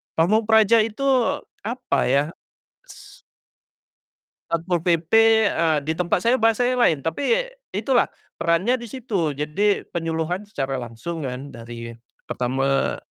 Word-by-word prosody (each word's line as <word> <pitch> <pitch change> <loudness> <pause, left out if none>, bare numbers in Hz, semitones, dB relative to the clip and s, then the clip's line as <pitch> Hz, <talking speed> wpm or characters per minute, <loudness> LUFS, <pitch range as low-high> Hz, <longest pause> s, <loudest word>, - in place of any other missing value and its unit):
pamong 210 +7 +2
praja 220 0 +5
itu 225 +5 -5 0.6
apa 235 +4 -2
ya? 140 +3 +3 0.7
S - - -14 1.3
Satpol 170 +1 0
PP, 170 0 0 0.4
eee, 160 -2 +1
di 160 - +1
tempat 180 0 0
saya 240 +5 +3
bahasanya 245 +2 +2
lain. 155 -4 +2
Tapi 285 - 0 0.2
itulah 260 -3 +2 0.3
perannya 180 +10 +1
di 240 -1 -8
situ. 200 - -2
Jadi 150 +9 0
penyuluhan 165 +3 -3
secara 135 -10 -3
langsung 125 +7 -6
kan 130 +2 -5
dari 115 -1 -9 0.3
pertama 135 +2 0
170 Hz, 120 wpm, -22 LUFS, 140-220 Hz, 1.3 s, praja